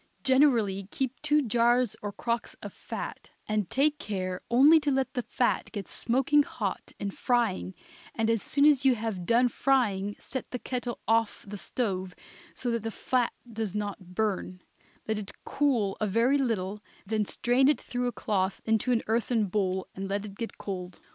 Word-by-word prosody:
Generally 235 -8 +3
keep 265 +1 -3
two 300 0 +3
jars 240 -1 +3
or 205 - -3
crocks 235 +3 -3
of - - -7
fat, - - -7 0.2
and 215 -4 0
take 295 +2 +2
care 185 -5 -3
only 280 +7 +7
to 295 - -1
let 270 -1 0
the 250 - -1
fat 245 +1 0
get 205 -3 -5
smoking 265 +5 +2
hot - - -4
in 200 - -3
frying, 220 -6 0 0.4
and 225 -1 +1
as 225 -2 +2
soon 280 +1 +2
as 290 -3 +5
you 265 -2 +5
have 215 -6 -4
done 240 +2 +5
frying 210 -7 +1
set 260 - -6
the 250 - -3
kettle 245 -1 -4
off 225 0 +1
the 205 - -6
stove 190 -4 -3 0.4
so 245 - -2
that 230 -1 -1
the 225 - -3
fat 245 +2 0 0.2
does 215 -3 -3
not 200 -3 -5
burn; 185 -3 -1 0.4
let 220 -1 0
it 200 -2 -7
cool 240 -9 +1
a 215 - +2
very 235 +8 +3
little, 210 -5 -1 0.2
then 215 +1 0
strain 245 +5 +2
it 295 - +3
through 245 0 -2
a - - 0
cloth 195 -4 -1
into 225 +3 +2
an 235 -2 +2
earthen 225 0 +1
bowl 190 -1 -1
and 195 +1 -5
let 200 +1 -1
it 200 - -8
get 230 +3 -6
cold. 180 -2 -6
225 Hz, 180 wpm, -28 LUFS, 200-250 Hz, 0.4 s, only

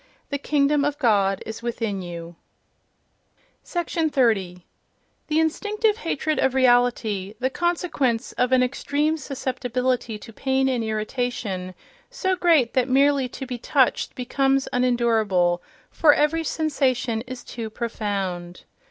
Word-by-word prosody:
"The 285 - -1
Kingdom 285 0 +2
of 290 0 0
God 200 -7 +2
is 220 0 -7
within 225 -4 -3
you".... 170 -1 -8 1.3
30. 245 - 0 0.6
The 310 +1 +1
instinctive 420 +7 +1
hatred 310 -6 -1
of 265 -1 +1
reality: 245 -6 +2
the 260 +1 0
consequence 325 -9 0
of 250 0 0
an 255 -1 +5
extreme 285 +4 0
susceptibility 255 -4 -2
to 225 +2 -12
pain 265 +2 +1
and 250 -3 0
irritation—so 225 - -3
great 325 -9 +3
that 255 -1 +1
merely 275 0 +3
to 265 - -7
be 250 -2 -5
"touched" 260 +1 +1
becomes 270 +2 +1
unendurable, 220 -8 +2 0.3
for 305 -3 +5
every 325 +2 +1
sensation 260 -8 0
is 255 -1 -7
too 230 -2 -6
profound. 195 -6 -4
255 Hz, 115 wpm, -24 LUFS, 220-285 Hz, 1.3 s, an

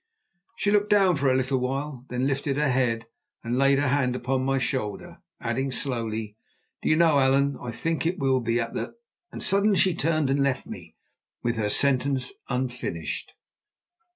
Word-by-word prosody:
She 200 - 0
looked 205 0 +2
down 195 -4 +4
for 140 -2 +2
a 130 - +3
little 130 0 0
while, 135 0 -3
then 125 +1 -1
lifted 140 0 -1
her 150 -2 +2
head 120 -3 0 0.4
and 120 +1 -2
laid 135 0 +4
her 145 -1 +1
hand 130 -2 +1
upon 130 +1 -1
my 135 0 +1
shoulder, 120 -5 -3 0.2
adding 130 +4 -2
slowly: 115 -5 -2 0.4
"Do - - -1
you 155 - +5
know, 160 -3 +4
Allan, 135 +1 +3
I 125 - -5
think 165 +8 -2
that 170 - +2
it - - -16
will 135 -1 +2 0.2
at - - -3
the—" - - -4 0.4
and - - -6
suddenly 200 +1 +3
she 185 0 +4
turned 155 -3 +1
and 140 - +1
left 140 -1 0
me - - -10 0.5
with 120 -1 0
her 105 -2 0
sentence 135 +1 +2 0.2
unfinished. 125 - -3
135 Hz, 180 wpm, -26 LUFS, 125-145 Hz, 0.5 s, you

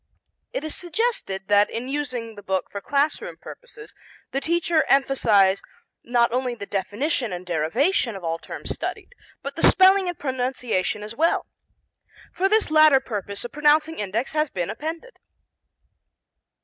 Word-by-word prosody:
It - - -4
is 315 - -3
suggested 355 - -2
that 205 0 +4
in 235 +3 -5
using 255 -5 -3
the 205 - -11
book 190 -1 -2
for 200 - -5
class 285 +6 +1
room - - -8
purposes 485 -3 -12 0.4
the 275 - -1
teacher 335 0 +1
emphasize 215 -8 +4 0.4
not 240 -1 +2
only 250 -1 -1
the 205 -3 -7
definition 210 - -2
and 180 0 -6
derivation 215 - +1
of 190 - -8
all 165 0 -2
terms - - -7
studied, - - -5 0.3
but - - -5
the - - -5
spelling 380 0 +6
and 350 - -5
pronunciation 250 -7 -2
as 215 +2 -7
well. 330 +5 +1 0.9
For 385 +2 +1
this 430 -6 +2
latter 310 -3 +7
purpose 205 -3 -5
a - - -4
pronouncing 300 +4 +2
index 210 +5 -2
has 305 -1 0
been 180 -2 -3
appended. 325 - -7
255 Hz, 150 wpm, -24 LUFS, 205-315 Hz, 0.9 s, latter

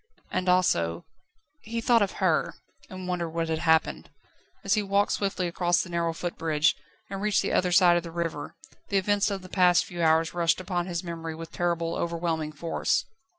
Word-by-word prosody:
And 185 0 -1
also... 85 - +2 0.6
He 230 +2 -4
thought 230 0 +3
of 200 - 0
her, - - +1 0.3
and 185 -2 -7
wondered 175 -2 -2
what 165 0 -2
had 160 -1 -1
happened. 160 -1 +1 0.5
As - - +1
he 215 - +2
walked 200 0 +1
swiftly 195 -2 -1
across 175 0 +1
the 180 - -10
narrow 170 -1 0
footbridge, 160 -2 0 0.4
and 195 0 -4
reached 210 -1 +2
the - - -1
other 180 -1 +2
side 175 -1 +6
of - - 0
the 170 - -8
river, 165 -3 -4 0.3
the 200 - +1
events 205 +2 +2
of 195 -2 -4
the - - -9
past 180 -1 +3
few 175 -2 -6
hours 160 0 +3
rushed 170 -1 +1
upon 180 -1 -2
his 170 -1 -3
memory 165 -2 -5
with 165 0 -9
terrible, 170 -1 -1
overwhelming 165 -2 -2
force. 165 +3 -1
175 Hz, 190 wpm, -27 LUFS, 165-185 Hz, 0.6 s, side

